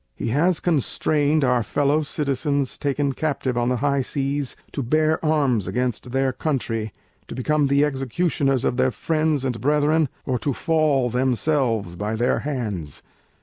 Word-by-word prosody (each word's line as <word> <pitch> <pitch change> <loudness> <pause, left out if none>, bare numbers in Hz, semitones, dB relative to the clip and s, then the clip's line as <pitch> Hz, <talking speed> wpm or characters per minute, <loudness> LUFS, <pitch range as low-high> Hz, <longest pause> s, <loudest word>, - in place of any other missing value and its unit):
He - - -3
has 155 +7 +2
constrained 150 -1 +1
our 125 -2 +3
fellow 145 +6 +1
Citizens 140 -2 -1
taken 140 -1 0
Captive 135 -3 -2
on 120 0 +1
the 125 - +1
high 140 +2 +1
Seas 140 +1 -2 0.2
to 140 - -3
bear 155 +6 +1
Arms 140 - +1
against 125 +3 -2
their 135 0 +1
Country, 115 -8 -2 0.4
to - - -7
become 150 +3 +1
the 140 +2 +3
executioners 135 -1 0
of 125 - 0
their 130 0 +3
friends 155 +3 0
and 125 -3 -2
Brethren, 150 +2 +2 0.2
or 125 -2 -1
to 140 +5 -1
fall 150 -6 +1
themselves 125 - 0
by 105 +4 -2
their 120 +3 +1
Hands. 105 - -4
135 Hz, 150 wpm, -23 LUFS, 125-150 Hz, 0.4 s, our